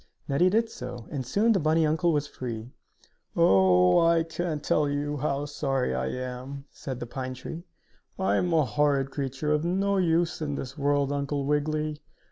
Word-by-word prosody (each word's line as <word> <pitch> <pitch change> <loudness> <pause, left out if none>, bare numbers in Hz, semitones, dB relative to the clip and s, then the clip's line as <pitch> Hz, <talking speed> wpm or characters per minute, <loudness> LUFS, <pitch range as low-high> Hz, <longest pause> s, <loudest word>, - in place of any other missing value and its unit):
Neddie 170 +7 +3
did 225 +4 +2
so, 125 - -8
and 140 -3 -3
soon 210 - +3
the 200 - +3
bunny 160 +1 +3
uncle 160 +3 +2
was 150 -2 +1
free. 120 -4 -6 0.6
"Oh, 95 - +5
I 165 0 +4
can't 165 -2 -3
tell 150 -1 +2
you 145 +1 -2
how 140 0 -1
sorry 135 -3 -1
I - - -1
am," 130 +2 -5
said 130 -3 -6
the 120 - -4
pine 130 +1 -5
tree. 165 +7 -8 0.5
"I 190 - +1
am 180 - 0
a 160 -3 +3
horrid 140 +3 +1
creature, 135 +2 -2
of 150 0 +2
no 195 +3 +1
use 170 -2 +1
in 145 -2 -2
this 135 -1 -6
world, 145 -1 +1
Uncle 140 0 -2
Wiggily! 150 +1 -1
145 Hz, 175 wpm, -27 LUFS, 135-165 Hz, 0.6 s, Oh